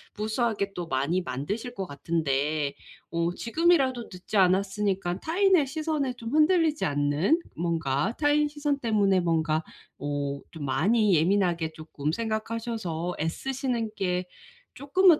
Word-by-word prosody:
무수하게 215 -2 -1
또 175 - -3
많이 160 +5 0
만드실 175 - -4
것 195 -6 -4
같은데 145 -1 -1 0.3
어 170 +1 0
지금이라도 265 - +2
늦지 185 +3 -4
않았으니까 190 -1 +2
타인의 360 -2 +3
시선에 305 -2 -1
좀 230 -2 -7
흔들리지 310 +2 +3
않는 145 - +2 0.2
뭔가 165 - 0
타인 295 0 +3
시선 295 -1 -1
때문에 205 -6 +2
뭔가 160 -2 +1 0.3
어 140 -1 -2
좀 155 -4 -6
많이 195 - +3
예민하게 170 -1 +2
쪼끔 155 -1 -4
생각하셔서 220 -5 -3
애쓰시는 240 - -2
게 180 -2 -1 0.5
쪼끔은 325 +4 +4
195 Hz, 290 characters per minute, -27 LUFS, 160-255 Hz, 0.5 s, 쪼끔은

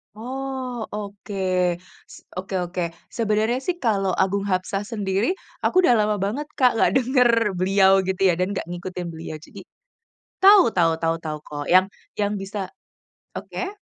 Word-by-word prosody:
Oh, 255 0 -5
oke. 205 0 -7 0.7
S - - -14
oke 190 +1 -4
oke. 175 +1 -4 0.3
Sebenarnya 220 +2 0
sih 345 +7 -2
kalau 195 -5 +1
Agung 195 +1 +1
Hapsah 190 +1 -1
sendiri 205 - -1 0.3
aku - - +1
udah 250 - +5
lama 210 0 +2
banget, 280 +9 -3
Kak, 250 -2 +5
nggak - - +3
denger 250 -1 +3 0.3
beliau, 190 +1 +4 0.2
gitu 190 0 -2
ya, - - +4
dan 185 +2 0
nggak 195 - -3
ngikutin 175 0 -5
beliau. 160 -1 -7
Jadi - - -12 0.8
tau 395 -1 +9
tau 170 -2 +4
tau 165 0 +1
tau 155 -1 -3
kok, 145 -1 -5
yang 185 +1 +7 0.3
yang 205 0 +1
bisa 195 0 -5 0.7
oke. 390 +3 -6
200 Hz, 150 wpm, -23 LUFS, 185-245 Hz, 0.8 s, tau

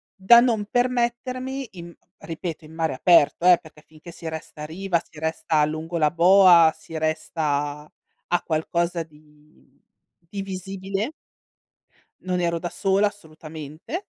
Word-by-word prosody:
da 200 +5 +7
non 230 -4 +1
permettermi 250 +2 -1
in 170 -2 -10 0.3
ripeto 165 -1 -6
in 155 - -14
mare 160 -1 -1
aperto, 170 +4 +4
eh, 180 -1 +8
perché 155 -1 -16
finché 155 +2 -13
si 165 - -9
resta 160 -1 -8
a - - -4
riva, 170 +2 -2
si 155 - -13
resta 160 -1 0
lungo 160 +3 -4
la 150 -2 +2
boa, 175 -2 +6
si 160 0 -9
resta 155 -1 -1 0.3
a 150 - -19 0.4
a 175 - +3
qualcosa 170 +2 -1
di 150 -1 -24 0.5
di 200 +3 -5
visibile 195 - -4 1.1
Non 180 -1 -2
ero 170 -1 0
da 175 +1 -5
sola 195 +3 +1
assolutamente; 160 - -9
170 Hz, 140 wpm, -23 LUFS, 155-195 Hz, 1.1 s, eh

